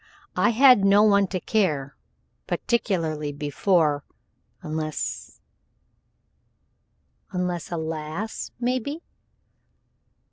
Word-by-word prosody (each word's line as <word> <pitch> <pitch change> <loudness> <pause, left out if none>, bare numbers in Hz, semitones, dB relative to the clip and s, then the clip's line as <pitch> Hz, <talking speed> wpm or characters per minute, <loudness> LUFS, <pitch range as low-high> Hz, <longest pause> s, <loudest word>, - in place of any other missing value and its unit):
I - - +3
had 250 -2 +6
no 200 +1 +6
one 200 -2 +4
to 185 0 -3
care 155 -11 0 0.5
particularly 165 -10 -1
before 145 +1 +1 0.6
unless 155 0 -4 0.8
" - - -45
"Unless 180 -5 -3
a 170 - -2
lass, 160 +6 -4
maybe?" 255 +6 -2
180 Hz, 80 wpm, -24 LUFS, 155-215 Hz, 0.8 s, had